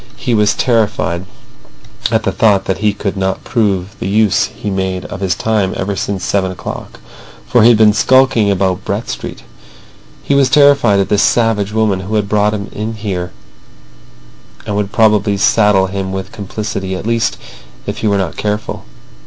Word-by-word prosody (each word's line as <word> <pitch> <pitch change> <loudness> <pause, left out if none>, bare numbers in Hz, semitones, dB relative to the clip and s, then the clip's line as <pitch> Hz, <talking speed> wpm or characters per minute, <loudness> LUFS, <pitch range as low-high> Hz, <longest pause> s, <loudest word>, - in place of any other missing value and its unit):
He 120 - -2
was 105 -2 +2
terrified 105 -7 0 0.8
at - - +1
the - - 0
thought 100 -3 +2
that 95 - -2
he 105 0 +2
could 100 -1 -4
not 95 0 -2
prove 100 -4 -1
the - - -3
use 105 0 +2
he 105 - -6
made 95 -1 -2
of 95 - -7
his 95 -2 0
time 105 -3 0
ever 100 +1 -2
since 100 -2 -3
seven 95 -2 0
o'clock, 90 - -8 0.5
for 120 - +3
he 115 - +7
had 120 - +5
been 105 -1 +5
skulking 130 -2 +3
about 95 -2 0
Brett - - -3
Street. - - -6 0.8
He - - 0
was 140 -2 +3
terrified 140 -7 +4
at 95 - -2
this 105 -1 +2
savage 110 -4 +1
woman 110 -3 +1
who 95 +4 -4
had 105 -2 0
brought 105 +1 +1
him 100 -1 -5
in 110 +1 -4
there, 90 -4 -3 1.3
and 105 - -3
would 105 -1 -2
probably 105 -2 +2
saddle 105 -1 +3
him 95 0 -4
with 95 0 -5
complicity, 100 -1 -4
at 95 - -6
least 115 0 0 0.5
if - - -4
he 110 - -1
were 100 -1 +2
not 95 -4 -2
careful. 105 0 -3
105 Hz, 180 wpm, -15 LUFS, 95-110 Hz, 1.3 s, he